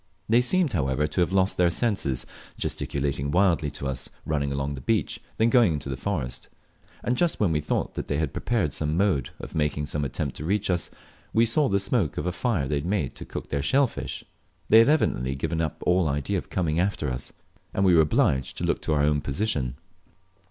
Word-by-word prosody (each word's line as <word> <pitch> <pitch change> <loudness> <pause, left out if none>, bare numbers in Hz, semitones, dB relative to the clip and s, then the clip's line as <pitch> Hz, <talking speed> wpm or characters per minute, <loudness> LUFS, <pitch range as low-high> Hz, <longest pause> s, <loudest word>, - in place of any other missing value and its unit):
They 115 +2 +5
seemed, 165 +3 +2
however, 70 -3 +1
to 75 +4 -1
have 85 - +2
half 95 - -2
lost 95 0 +2
their 90 -1 +4
senses, 85 - -1 0.3
gesticulating 70 0 -2
wildly 85 -3 +2
to 70 0 -7
us, 65 -1 -4 0.2
running 70 -2 -1
along 70 +1 -2
the 65 - -7
beach, - - 0 0.2
then 115 +1 +3
going 120 -10 +5
unto 70 -2 -4
the - - -2
forest; 65 -4 -3 0.5
and 120 - +1
just 175 +4 +1
when 100 -6 +2
we 75 -1 +1
thought 75 - -1
they 70 - -2
had 75 -3 -1
prepared 105 - 0
some 75 +1 -1
mode 95 -8 +1
of - - -8
making 75 -1 0
an 75 - -1
attempt 70 +1 -3
to - - -6
reach 100 +3 0
us, 85 -2 -1 0.4
we 115 +1 +5
saw 135 +5 +3
the 100 -1 +2
smoke 100 - 0
of - - -2
a 90 - 0
fire 90 - -1
they 75 - 0
had 70 - -3
made 90 -10 0
to - - -9
cook - - -7
their 70 - -1
shell 135 - +3
fish! 125 - -5 0.5
They 110 - +8
had 115 - +6
evidently 65 - +1
given 80 +4 -2
up 80 -1 -3
all 90 -3 +3
idea 70 -1 -1
of - - -11
coming 85 -3 0
after 90 -4 0
us, 60 +1 -4 0.4
and 95 - +1
we 90 - +5
were 80 - +7
obliged 65 -3 +1
to - - -4
look - - 0
to 80 - -1
our 75 -1 +2
own 75 0 +2
position. 70 - -1
80 Hz, 220 wpm, -26 LUFS, 70-100 Hz, 0.5 s, They